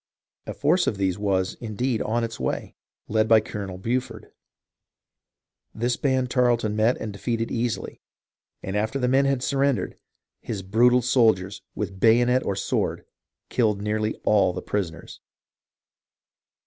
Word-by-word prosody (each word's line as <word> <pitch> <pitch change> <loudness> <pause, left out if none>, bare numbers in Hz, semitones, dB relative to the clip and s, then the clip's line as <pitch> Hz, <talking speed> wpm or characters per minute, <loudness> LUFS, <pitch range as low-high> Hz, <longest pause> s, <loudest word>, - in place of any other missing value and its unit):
A - - -5
force 165 +5 +2
of 105 - 0
these 95 -1 0
was, 95 -2 0
indeed, 115 +1 -2
on 115 +2 0
its 115 -1 -5
way, - - -3 0.3
led 110 0 +1
by 110 0 +7
Colonel 100 -3 -6
Buford. 125 +6 -3 1.4
This 120 +2 0
band 130 -2 0
Tarleton 120 -4 +2
met 110 +3 +2
and 110 - -5
defeated 115 +2 -2
easily, 120 -1 -3 0.6
and 95 - -4
after 110 +5 0
the 125 -2 0
men 135 +2 +3
had 135 -2 0
surrendered, 140 -1 0 0.4
his 100 -4 -5
brutal 120 +5 +4
soldiers, 110 -6 +2
with 100 -2 -4
bayonet 120 +4 +4
or 100 - -1
sword, - - -2 0.4
killed 110 -5 +1
nearly 110 +1 -1
all 100 -4 +3
the 90 - -5
prisoners. 90 -5 -4
110 Hz, 135 wpm, -24 LUFS, 105-125 Hz, 1.4 s, by